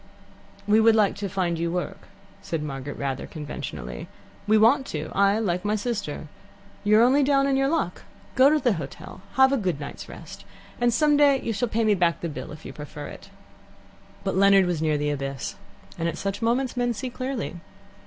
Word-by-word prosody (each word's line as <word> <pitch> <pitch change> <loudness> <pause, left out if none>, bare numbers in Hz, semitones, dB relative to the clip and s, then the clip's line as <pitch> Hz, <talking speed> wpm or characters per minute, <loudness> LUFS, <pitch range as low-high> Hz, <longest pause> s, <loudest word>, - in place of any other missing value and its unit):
"We 210 +1 +5
would 225 0 +6
like 210 -3 +3
to 200 -1 -3
find 175 -3 -1
you 170 0 -1
work," 180 0 -4 0.3
said 165 -5 -3
Margaret 135 -1 -5
rather 135 -1 -3
conventionally. 60 - -6 0.4
"We 215 +1 +5
want 265 +6 +4
to 155 0 -5
I, 200 +1 +3
like 180 -5 -1
my 210 +1 +1
sister. 205 -9 -3 0.6
You're 215 +2 +5
only 265 +4 +5
down 275 0 +3
in 275 -1 +2
your 270 0 +2
luck. 285 - -1 0.3
Go 265 +1 +6
to 305 - +3
the 250 -6 +2
hotel, 185 +2 -8
have 265 0 +5
a 275 - +2
good 180 - -1
night's 145 - -8
rest, 165 - -10 0.4
and 240 0 +3
some 295 +5 +3
day 285 -2 +5
you 230 - -3
shall 235 +3 -1
pay 230 +1 0
me 215 -1 +4
back 175 -3 +1
the 170 - -2
bill, 150 - -7
if 150 +1 -11
you - - -7
prefer 150 0 -8
it." - - -12 0.9
But - - -1
Leonard 195 0 +6
was 175 -3 -1
near 155 -2 +1
the 150 0 0
abyss, 135 -2 -4 0.5
and 165 +1 0
at - - -5
such 195 +2 -3
moments 245 +3 0
men 245 -1 0
see 255 +3 -4
clearly. 255 -7 -4
200 Hz, 200 wpm, -25 LUFS, 165-245 Hz, 0.9 s, would